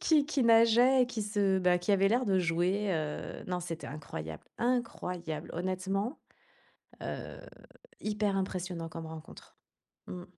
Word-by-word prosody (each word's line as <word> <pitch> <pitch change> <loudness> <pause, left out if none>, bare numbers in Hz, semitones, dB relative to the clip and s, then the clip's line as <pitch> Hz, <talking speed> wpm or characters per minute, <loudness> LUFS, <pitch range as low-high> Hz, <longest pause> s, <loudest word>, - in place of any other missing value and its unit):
Qui 300 -3 +4
qui 295 -3 +1
nageait 235 +3 +6
et 245 - +2
qui 235 -3 -3
se 205 -2 +2
bah, 180 -1 +4
qui 205 +4 +1
avaient 195 0 +4
l'air 245 +4 +2
de 190 -2 +3
jouer, 180 +4 +1
heu 155 -3 -3
non, 180 -1 -1
c'était 165 -2 -5
incroyable, 80 - -6 0.2
incroyable! 180 -10 -2
Honnêtement? 190 - -2 0.8
Heu, - - -5 0.6
hyper 210 -2 0
impressionnant 180 -3 -3
comme 165 0 -7
rencontre. 160 0 -11 0.5
Mmh. 180 -1 -6
190 Hz, 140 wpm, -31 LUFS, 170-225 Hz, 0.8 s, nageait